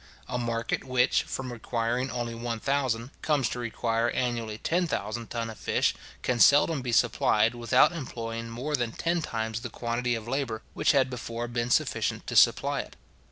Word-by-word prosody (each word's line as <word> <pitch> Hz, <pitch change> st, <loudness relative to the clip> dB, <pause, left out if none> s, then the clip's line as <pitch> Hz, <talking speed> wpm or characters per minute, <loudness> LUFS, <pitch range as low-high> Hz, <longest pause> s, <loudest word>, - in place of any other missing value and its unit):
A 125 Hz, -1 st, -2 dB
market 115 Hz, -1 st, -2 dB
which, 130 Hz, -1 st, +2 dB
from 130 Hz, -2 st, -5 dB
requiring 120 Hz, +2 st, -1 dB
only 120 Hz, -1 st, -3 dB
one 115 Hz, 0 st, -4 dB
thousand, 130 Hz, -2 st, -1 dB
comes 145 Hz, -6 st, +2 dB
to 125 Hz, -, -4 dB
require 115 Hz, 0 st, 0 dB
annually 120 Hz, -4 st, -2 dB
ten 175 Hz, +9 st, 0 dB
thousand 115 Hz, -4 st, -3 dB
ton 115 Hz, -1 st, -3 dB
of 110 Hz, -1 st, -9 dB
fish, -, -, +1 dB, 0.3 s
can 125 Hz, -1 st, 0 dB
seldom 145 Hz, +3 st, +5 dB
be 125 Hz, -1 st, -3 dB
supplied, 115 Hz, -1 st, +3 dB
without 120 Hz, +4 st, +4 dB
employing 115 Hz, -7 st, -5 dB
more 130 Hz, +6 st, -2 dB
than 120 Hz, -3 st, -2 dB
ten 170 Hz, 0 st, 0 dB
times 110 Hz, -4 st, -3 dB
the 120 Hz, -, -5 dB
quantity 120 Hz, +1 st, -1 dB
of 115 Hz, 0 st, -6 dB
labour 125 Hz, -4 st, -2 dB
which -, -, +3 dB
had 130 Hz, -2 st, +3 dB
before 120 Hz, -1 st, -4 dB
been 120 Hz, 0 st, -2 dB
sufficient -, -, 0 dB
to -, -, -5 dB
supply -, -, +4 dB
it. -, -, -7 dB
120 Hz, 175 wpm, -28 LUFS, 115-130 Hz, 0.3 s, seldom